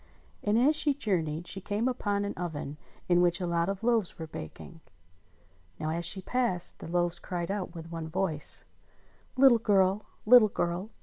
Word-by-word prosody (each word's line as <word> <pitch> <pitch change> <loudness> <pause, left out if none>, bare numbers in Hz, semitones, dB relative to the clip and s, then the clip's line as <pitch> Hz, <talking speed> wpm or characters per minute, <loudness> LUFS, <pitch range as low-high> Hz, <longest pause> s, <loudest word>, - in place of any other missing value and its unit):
And 210 +1 +1
as 280 +6 +4
she 295 -2 +1
jour 210 -11 0
neyed 155 +2 -5
she 195 +2 -3
came 210 +5 -1
upon 205 -5 -1
an 200 - -3
oven 155 -4 -5 0.3
in 175 0 +4
which 175 0 +2
a 180 - -2
lot 170 +1 0
of 195 +2 -4
loaves 230 -5 +1
were 160 - -5
baking. 160 - -9 1.0
Now, 155 0 -2
as 170 +1 -3
she 190 +3 +1
passed, 235 -8 0
the - - -8
loaves 175 0 0
cried 175 0 -4
out 190 -3 -4
with 165 0 -8
one 165 -1 -5
voice: 160 -2 -1 0.7
"Little 255 -3 +7
girl! 200 -1 +2 0.2
Little 235 -1 +8
girl! 175 +3 -2
180 Hz, 180 wpm, -29 LUFS, 170-210 Hz, 1.0 s, Little